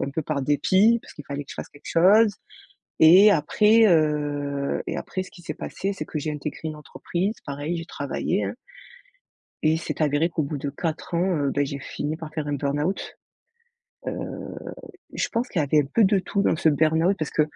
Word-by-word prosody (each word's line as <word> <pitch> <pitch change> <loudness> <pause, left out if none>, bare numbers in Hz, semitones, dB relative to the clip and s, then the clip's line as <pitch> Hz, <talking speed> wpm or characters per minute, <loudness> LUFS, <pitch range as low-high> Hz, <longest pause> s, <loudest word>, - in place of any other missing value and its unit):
un 140 - -2
peu 160 - -2
par 145 -2 -2
dépit 190 - +3
parce - - -14
qu'il 150 - -10
fallait 140 0 -4
que - - -14
je - - -7
fasse - - -7
quelque 145 0 -13
chose 205 +5 +5 0.7
et 185 +6 +8
après, 210 +8 +4
heu 145 -4 +1
et - - -3
après 185 - -4
ce - - -13
qui 175 - -15
s'est - - -4
passé, 195 +1 -4
c'est - - -6
que 155 - -5
j'ai 155 +1 -3
intégré 150 0 -6
une 155 - -5
entreprise. 175 +7 -3
Pareil, 145 +4 -3
j'ai 165 - -6
travaillé, - - -2
hein. - - -4 1.1
Et 155 - +3
il - - +1
s'est 165 - -5
avéré 150 +3 +2
qu'au 160 -2 -1
bout 145 +1 -4
de 145 +1 -3
4 160 +4 -4
ans, 175 +1 +1
heu, 140 -2 0
beh, 145 0 +1
j'ai 140 0 -5
fini 150 +3 -4
par 155 -2 -9
faire 155 -1 -3
un 145 - -1
burn-out. 145 +6 -2 0.9
Heu, - - -1 1.0
je - - -1
pense 235 +2 -2
qu'il 170 - -1
y - - +3
avait 150 +2 +3
un 140 - -3
peu 225 - +5
de 195 0 +4
tout 200 +2 -1
dans 165 - +2
ce 160 - +2
burn-out, 160 +5 +3
parce 155 - -3
que 155 - +2
155 Hz, 215 wpm, -24 LUFS, 145-185 Hz, 1.1 s, et